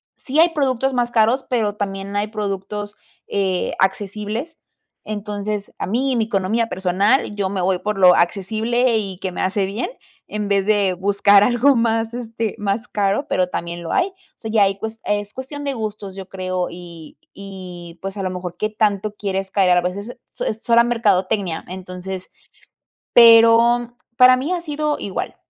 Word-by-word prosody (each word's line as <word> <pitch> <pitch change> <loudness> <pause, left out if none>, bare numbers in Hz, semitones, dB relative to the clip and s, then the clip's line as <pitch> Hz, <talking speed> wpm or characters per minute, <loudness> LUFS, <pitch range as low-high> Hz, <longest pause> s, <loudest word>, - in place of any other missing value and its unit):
sí 280 +3 -2
hay 335 +2 +7
productos 270 -4 0
más 240 -1 0
caros, 235 +3 +2
pero 220 -5 0
también 200 -1 -4
hay 205 +1 0
productos, 205 0 -4 0.3
eh, 190 -2 -1
accesibles. 210 - -2 0.5
Entonces, 205 -1 -4
a - - -2
mí, 255 +7 0
en - - 0
mi - - +3
economía 220 +2 0
personal, 195 +6 +1
yo 200 -2 -1
me 195 0 -3
voy 185 0 +1
por 210 +1 -3
lo 180 -1 +7
accesible 220 +7 +1
y 195 -3 -5
que 185 0 -4
me - - -4
hace 195 +1 0
bien, 200 +5 -3 0.4
en 210 -1 -3
vez 200 -1 +1
de 205 -3 +2
buscar 200 +2 +4
algo 250 +5 +4
más, 225 -1 0
este, 225 -2 -4
más 210 +3 -2
caro, 205 +5 0
pero 185 -1 +1
también 170 0 -5
lo 165 - -5
hay. 370 - +2
O 390 - -13 0.2
sea, 220 - -7
ya 215 -2 +4
ahí 195 0 +1
cues 220 +2 -6
es 205 0 -2
cuestión 285 +3 -7
de 280 - -1
gustos, 215 -4 -5
yo 195 -1 -9
creo, 185 -1 -2
y 170 -3 -11 0.2
y, 180 -3 -9
pues, 195 +1 -5
a - - -3
lo 185 - -1
mejor, 180 -1 -6
qué 215 - -1
tanto 210 -1 0
quieres 195 -2 -3
caer, 190 -3 +3
a - - +6
la 175 - +3
vez, 180 +2 -3
es 205 +3 -7
es 245 - -10 0.4
es 225 - -25
sola 235 0 +5
mercadotecnia. 205 -6 0
Entonces 185 0 -7 0.9
pero 235 +1 +6 0.2
para 255 +1 +7
mí, 265 +6 -3
ha 360 - -1
sido 300 -2 -2
igual. 195 - -4
205 Hz, 185 wpm, -20 LUFS, 190-230 Hz, 0.9 s, hay